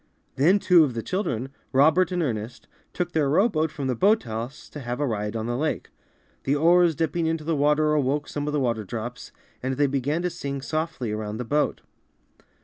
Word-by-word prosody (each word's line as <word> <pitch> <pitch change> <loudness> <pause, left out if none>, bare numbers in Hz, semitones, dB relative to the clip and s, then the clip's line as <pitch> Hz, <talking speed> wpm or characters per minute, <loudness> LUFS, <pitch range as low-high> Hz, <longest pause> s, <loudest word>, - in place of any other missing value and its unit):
Then 165 +9 +4
two 180 -4 +5
of 130 -6 -1
the 115 - -3
children, 135 - -2 0.2
Robert 160 +6 +4
and 180 -1 0
Ernest, 115 -3 -4 0.2
took 175 -1 -3
their 150 -4 +1
rowboat 160 -1 +2
from 145 -2 -5
the 130 - +1
boathouse 125 - 0
to 150 - -8
have 120 -1 -4
a 145 - +1
ride 105 -3 -2
on 110 -1 -2
the 120 +1 -2
lake. 155 +4 -2 0.5
The 140 - +1
oars 170 +2 +4
dipping 165 +2 0
into 160 -1 -1
the 160 +1 0
water 150 +1 +3
awoke 145 0 0
some 145 0 -4
of 150 - -2
the 150 - +1
water 115 -4 0
drops, 120 +5 -6 0.3
and 130 +1 -2
they 145 +2 +3
began 140 +4 -1
to 180 - 0
sing 140 -3 -5
soMy 155 -7 -2
around 105 0 -4
the 125 - -4
boat. 150 +5 0
145 Hz, 200 wpm, -25 LUFS, 125-160 Hz, 0.5 s, two